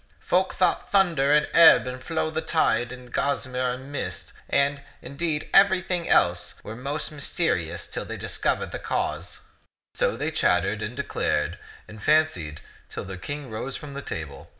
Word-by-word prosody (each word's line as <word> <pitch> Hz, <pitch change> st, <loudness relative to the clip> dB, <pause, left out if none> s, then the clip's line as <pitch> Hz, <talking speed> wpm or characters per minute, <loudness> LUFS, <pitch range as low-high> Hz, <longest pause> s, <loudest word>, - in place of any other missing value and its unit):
Folk 185 Hz, +1 st, +1 dB
thought 180 Hz, -2 st, +1 dB
thunder 170 Hz, -8 st, +3 dB
and 150 Hz, 0 st, +5 dB
the -, -, -10 dB
ebb 165 Hz, -5 st, +8 dB
and 130 Hz, 0 st, -6 dB
flow 160 Hz, 0 st, -1 dB
of -, -, -10 dB
the 160 Hz, -, -1 dB
tide 120 Hz, -8 st, +1 dB
and 125 Hz, -1 st, -11 dB
gossamer 130 Hz, -3 st, 0 dB
and 130 Hz, +3 st, -9 dB
mist, 95 Hz, -8 st, -4 dB, 0.2 s
and, 140 Hz, 0 st, +2 dB, 0.2 s
in 140 Hz, -, -10 dB
deed, 155 Hz, 0 st, -1 dB
everything 185 Hz, -3 st, +4 dB
else, 90 Hz, 0 st, +3 dB
were 110 Hz, -, -7 dB
most 140 Hz, +6 st, -3 dB
mysterious 90 Hz, -, 0 dB
till -, -, -5 dB
they -, -, -6 dB
discovered -, -, -1 dB
the -, -, -5 dB
cause." -, -, -3 dB, 0.5 s
So -, -, 0 dB
they -, -, -2 dB
chattered 95 Hz, +4 st, +1 dB
and 115 Hz, +4 st, -5 dB
declared 80 Hz, -, -1 dB, 0.3 s
and 110 Hz, -1 st, -11 dB
fancied 95 Hz, -, +1 dB, 0.3 s
till -, -, -6 dB
the 95 Hz, -1 st, -6 dB
King 145 Hz, +3 st, -6 dB
rose 125 Hz, +5 st, -4 dB
from 145 Hz, -2 st, -9 dB
the 140 Hz, -, -5 dB
table. 75 Hz, -, -7 dB
135 Hz, 175 wpm, -25 LUFS, 110-155 Hz, 0.5 s, ebb